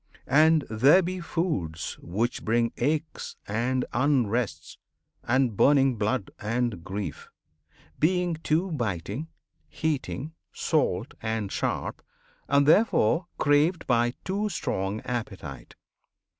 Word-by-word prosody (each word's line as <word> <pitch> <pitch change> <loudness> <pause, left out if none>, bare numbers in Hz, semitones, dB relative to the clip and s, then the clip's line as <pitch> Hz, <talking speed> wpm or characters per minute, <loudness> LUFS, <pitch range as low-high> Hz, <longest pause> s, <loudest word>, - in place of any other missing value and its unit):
And 155 +1 +5
there 135 - +5
be 185 +2 -3
foods 155 - -3
which 110 +7 -2
bring 115 +1 +1
Aches 155 +5 -2
and 120 +5 0
unrests, 120 - 0 0.5
and 130 -2 +1
burning 135 +1 +4
blood, 105 0 -1
and 115 -4 -1
grief, 100 +2 -5 0.7
Being 175 +1 +2
too 170 +5 +1
biting, 110 - -3 0.4
heating, 155 -1 -3 0.2
salt, - - 0
and 110 -3 -2
sharp, - - -2 0.5
And 140 0 +3
therefore 170 - +4
craved 150 +4 +2
by 120 0 +2
too 205 +3 -1
strong 100 - -2
appetite. 115 -6 -6
130 Hz, 100 wpm, -27 LUFS, 110-160 Hz, 0.7 s, And